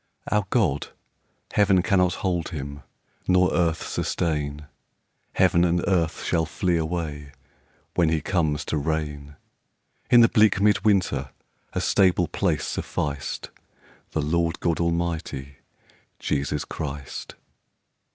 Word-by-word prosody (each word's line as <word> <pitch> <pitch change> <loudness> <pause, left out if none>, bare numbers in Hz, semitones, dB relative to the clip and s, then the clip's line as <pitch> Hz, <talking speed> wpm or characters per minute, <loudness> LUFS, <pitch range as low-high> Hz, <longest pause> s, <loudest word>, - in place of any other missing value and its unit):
Our 105 -2 +1
God, 90 - +1 0.7
Heaven 95 -3 +4
cannot 90 -3 +2
hold 90 -3 0
him 70 -3 -6 0.5
Nor 90 0 +4
earth 85 -2 +1
sustain; 75 -2 -2 0.7
Heaven 85 - +4
and 85 0 +2
earth 85 -4 +1
shall 80 -2 +1
flee 85 +4 0
away, 80 -3 -3 0.6
When 85 -2 +3
he 80 0 +1
comes 75 -3 0
to 80 - -1
reign. 75 -1 -3 0.7
In 120 - +8
the 115 - +8
bleak 105 -3 +4
mid 105 0 +3
winter 90 -10 +2 0.4
A - - -1
stable 90 -3 +3
place - - 0
sufficed 70 -2 -3 0.6
The 80 - 0
Lord 85 +2 0
God 85 -2 0
Almighty, 85 -5 -2 0.6
Jesus 75 0 -1
Christ. 70 -3 -6
80 Hz, 115 wpm, -25 LUFS, 75-90 Hz, 0.7 s, In